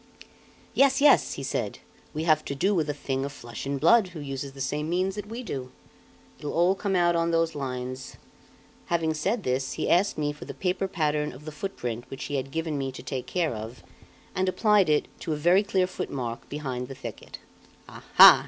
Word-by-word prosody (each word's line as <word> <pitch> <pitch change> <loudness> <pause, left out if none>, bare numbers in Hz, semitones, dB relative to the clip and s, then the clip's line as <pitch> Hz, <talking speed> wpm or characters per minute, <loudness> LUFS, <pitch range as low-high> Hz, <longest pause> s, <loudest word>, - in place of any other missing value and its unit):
"Yes, 270 -1 +4
yes!" 290 +1 +5
he - - -6
said. - - -2 0.3
"We 155 +1 -3
have 155 -2 +3
to 140 - -3
do 195 +9 +2
with 160 -5 +1
a - - +1
thing 135 -2 -2
of 140 - -3
flesh 120 -2 -8
and 140 0 -1
blood, 230 - +5
who 175 -3 -9
uses 135 -1 -5
the 135 - -12
same 150 +3 -2
means 185 +2 +1
that 205 0 -6
we 230 +4 -6
do. 130 - -5 0.7
It'll 145 -1 -4
all 175 +3 +4
come 195 0 -1
out 175 -1 +4
on 165 0 +2
those 165 -1 +2
lines." 130 -2 -5 0.7
Having 165 -2 +1
said 195 +8 -1
this, 130 0 -1
he - - -2
asked 185 +4 +3
me 145 -1 0
for 150 - -10
the - - -7
paper 185 +1 0
pattern 150 -4 0
of 140 +4 -12
the 155 - -5
footprint 125 - -4
which 135 - -6
he 145 - -3
had 135 0 -3
given 160 -1 -2
me 135 -1 -2
to 130 - -9
take 130 -3 -4
care 170 -7 0
of, 110 +3 -7 0.5
and 185 0 +1
applied 210 -2 +4
it 150 -1 +3
to 160 - -2
a 150 +1 -5
very 180 +3 +6
clear 195 -3 +1
footmark 125 -9 -5
behind 130 -4 -4
the 135 - -8
thicket. 120 -5 -8 0.5
"Aha!" - - +8
150 Hz, 210 wpm, -27 LUFS, 135-185 Hz, 0.7 s, Aha